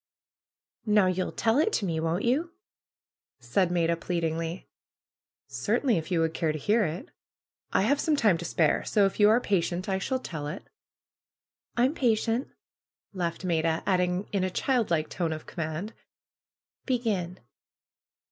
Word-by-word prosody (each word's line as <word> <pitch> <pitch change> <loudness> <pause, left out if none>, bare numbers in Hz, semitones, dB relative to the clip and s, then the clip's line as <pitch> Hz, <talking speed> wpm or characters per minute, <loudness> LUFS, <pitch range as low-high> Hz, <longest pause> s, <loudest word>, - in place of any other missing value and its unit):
^^Now 205 -4 +4
you'll 185 - -2
tell 225 +4 +1
it 375 +8 +3
to 205 - 0
me, 165 -3 -1
won't 165 +5 -1
you?" 310 +8 +1 0.9
said 135 +10 +1
Maida, 170 -1 +1
pleadingly. 165 0 -3 0.8
Certainly, 245 -11 +1
if 160 - -8
you 175 -3 +1
would 160 0 0
care 160 -1 0
to 155 - -4
hear 210 +9 +2
it. 160 +3 -5 0.6
I - - +3
have 285 +7 +2
some 310 0 +2
time 210 - +3
to - - -5
spare, 160 -2 +2
so 205 -2 +3
if 195 - -2
you 205 0 +7
are 225 +3 +5
patient 180 -4 -1
I 190 -1 0
shall 260 +7 -1
tell 160 - -6
it." 155 +6 -7 1.1
^M'm 255 +4 +3
patient 235 -2 +1 0.4
!" - - -54
laughed 175 -1 -3
Maida; 165 -2 +1
adding 180 0 +1
in 195 -2 0
a 185 - +1
child 245 +4 0
like 155 -2 +1
tone 170 -3 -2
of 155 - -8
command, 165 +6 -4 0.9
^^Begin!" 210 -9 -1
185 Hz, 155 wpm, -28 LUFS, 165-220 Hz, 1.1 s, you